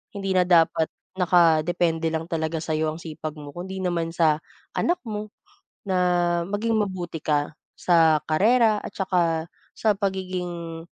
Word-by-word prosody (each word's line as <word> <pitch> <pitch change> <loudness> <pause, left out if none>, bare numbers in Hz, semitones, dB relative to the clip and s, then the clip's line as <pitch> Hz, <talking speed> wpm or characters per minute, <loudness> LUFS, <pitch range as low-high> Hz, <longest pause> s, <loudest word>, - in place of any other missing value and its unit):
hindi 195 -1 -2
na 180 - +5
dapat 165 -2 +3 0.3
nakadepende 165 -2 +2
lang 160 0 -3
talaga 160 0 -2
sa'yo 155 -1 -1
ang 160 - -8
sipag 155 -1 -6
mo 145 -1 -9
kundi 190 +2 -6
naman 175 -3 -1
sa 165 -2 +3 0.4
anak 350 - +1
mo 210 -1 -5 0.6
na 190 - +1 0.5
maging 210 +4 -1
mabuti 185 -6 -3
ka 150 0 0 0.2
sa 165 -3 +3
karera 220 +7 +4
at - - -7
saka 170 -4 0 0.2
sa 215 -2 +1
pagiging 180 -4 -4
170 Hz, 135 wpm, -24 LUFS, 160-190 Hz, 0.6 s, na